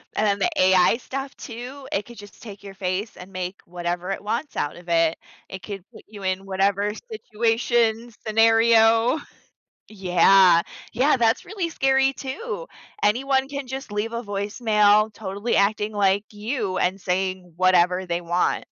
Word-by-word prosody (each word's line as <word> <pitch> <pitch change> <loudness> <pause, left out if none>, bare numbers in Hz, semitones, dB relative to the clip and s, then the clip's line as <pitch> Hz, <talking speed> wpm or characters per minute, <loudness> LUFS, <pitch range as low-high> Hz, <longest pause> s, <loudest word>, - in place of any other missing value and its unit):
and 215 - +1
then 200 0 +1
the - - +2
AI 185 +4 +5
stuff, 270 +2 -6
too, 255 +3 -9
it 205 - -2
could 240 - -13
just 205 -1 -13
take 200 -3 -11
your 195 -1 -9
face 190 +3 -3
and 185 +2 -12
make 185 0 -5
whatever 175 +1 -4
it 195 - -4
wants 235 +8 -3
out 145 - -2
of 175 0 -13
it. 165 -1 +2 0.3
It 190 - -8
could 195 0 -7
put - - -13
you 205 -2 -11
in 190 +1 -2
whatever 200 +2 +1 0.2
situation, 230 - 0 0.2
scenario. 225 +3 +4 0.7
Yeah, 185 -2 +5 0.3
yeah, 270 +6 +3
that's 230 -1 +1
really 375 -6 -3
scary, 270 -2 +2
too, 450 - -6 0.3
anyone 265 +4 +2
can 280 -1 -5
just 265 -3 -7
leave 215 +2 -2
a 235 0 -3
voicemail 210 +1 +2
totally 205 +2 -3
acting 210 +1 +1
like 200 0 +2
you 210 -2 -3
and 185 +2 0
saying 185 -1 -2
whatever 180 0 +3
they 175 -1 -2
want. 175 +1 0
210 Hz, 155 wpm, -23 LUFS, 185-235 Hz, 0.7 s, AI